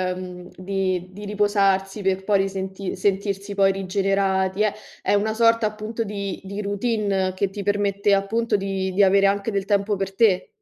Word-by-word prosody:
mhmm, 180 Hz, -1 st, -8 dB
di 185 Hz, -1 st, -2 dB
di 205 Hz, +2 st, -9 dB
riposarsi 200 Hz, -1 st, +1 dB
per 190 Hz, 0 st, 0 dB
poi 200 Hz, 0 st, +2 dB
risenti 190 Hz, 0 st, -3 dB
sentirsi 200 Hz, +1 st, -1 dB
poi 195 Hz, -1 st, +4 dB
rigenerati 195 Hz, 0 st, 0 dB
è 210 Hz, -, +1 dB, 0.3 s
è -, -, +1 dB
una 215 Hz, +2 st, +1 dB
sorta, 230 Hz, 0 st, +3 dB
appunto, 215 Hz, +2 st, -4 dB
di 200 Hz, -2 st, -5 dB
di 200 Hz, +2 st, -5 dB
routine 200 Hz, -2 st, -1 dB
che 195 Hz, 0 st, 0 dB
ti 200 Hz, +1 st, -6 dB
permette, 200 Hz, 0 st, +1 dB
appunto, 220 Hz, +3 st, +1 dB
di 195 Hz, -1 st, -2 dB
di 200 Hz, +2 st, +4 dB
avere 195 Hz, +1 st, +5 dB
anche 200 Hz, +2 st, 0 dB
del 200 Hz, -2 st, -1 dB
tempo 205 Hz, 0 st, +1 dB
per 195 Hz, 0 st, -4 dB
te. 200 Hz, -4 st, +3 dB
195 Hz, 170 wpm, -23 LUFS, 190-205 Hz, 0.3 s, avere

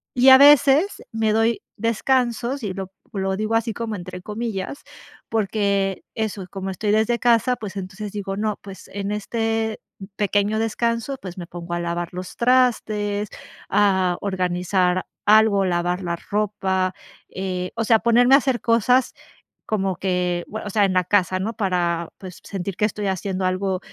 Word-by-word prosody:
Y 250 Hz, +2 st, +6 dB
a 260 Hz, -, +11 dB
veces 290 Hz, +6 st, +5 dB
me 225 Hz, -1 st, +1 dB
doy 225 Hz, +1 st, +2 dB, 0.2 s
descansos 240 Hz, +2 st, 0 dB
y 195 Hz, -, -2 dB
lo, 190 Hz, 0 st, -6 dB, 0.2 s
lo 190 Hz, -1 st, -1 dB
digo 215 Hz, +2 st, -1 dB
así: 225 Hz, 0 st, 0 dB
"Como" 220 Hz, 0 st, -4 dB
entre 180 Hz, 0 st, -8 dB
comillas, 215 Hz, +3 st, -5 dB, 0.5 s
porque 200 Hz, -3 st, 0 dB
eso 215 Hz, -3 st, -3 dB
y -, -, -11 dB
como 195 Hz, +1 st, -5 dB
estoy 205 Hz, +3 st, -1 dB
desde 220 Hz, +3 st, +2 dB
casa, 240 Hz, +1 st, +3 dB
pues 210 Hz, -4 st, -8 dB
entonces 195 Hz, +2 st, -6 dB
digo: 195 Hz, -1 st, -4 dB
"No, 210 Hz, -1 st, -1 dB
pues 195 Hz, -1 st, -11 dB
en 200 Hz, 0 st, -3 dB
este 225 Hz, +1 st, -1 dB, 0.4 s
pequeño 205 Hz, +1 st, +1 dB
descanso, 230 Hz, +4 st, -1 dB
pues 185 Hz, -1 st, -8 dB
me 175 Hz, -, -7 dB
pongo 175 Hz, 0 st, -7 dB
a 175 Hz, -, -1 dB
lavar 170 Hz, 0 st, -3 dB
los 180 Hz, 0 st, -7 dB
trastes, 215 Hz, -5 st, +1 dB, 0.4 s
a 190 Hz, -3 st, +3 dB
organizar 185 Hz, -1 st, 0 dB, 0.2 s
algo, 210 Hz, -2 st, +5 dB
lavar 175 Hz, +1 st, 0 dB
la 170 Hz, -1 st, -2 dB
ropa", 190 Hz, -2 st, -1 dB, 0.4 s
eh, 185 Hz, -1 st, -4 dB
o 230 Hz, -, -1 dB
sea, 225 Hz, 0 st, +5 dB
ponerme 245 Hz, +3 st, +5 dB
a -, -, +9 dB
hacer 260 Hz, -3 st, -1 dB
cosas 245 Hz, +3 st, +3 dB, 0.5 s
como 195 Hz, -4 st, 0 dB
que 180 Hz, -2 st, -1 dB
bue, 220 Hz, -, -5 dB
o -, -, -4 dB
sea, 205 Hz, +1 st, +2 dB
en 195 Hz, -, 0 dB
la 185 Hz, 0 st, +3 dB
casa, 185 Hz, -1 st, +2 dB
¿no?, 215 Hz, +5 st, -2 dB
para 175 Hz, -4 st, 0 dB
pues 185 Hz, -2 st, -10 dB
sentir 195 Hz, -1 st, -5 dB
que -, -, -2 dB
estoy 210 Hz, -1 st, -2 dB
haciendo 190 Hz, 0 st, -2 dB
algo, 185 Hz, 0 st, 0 dB
205 Hz, 165 wpm, -22 LUFS, 185-225 Hz, 0.5 s, a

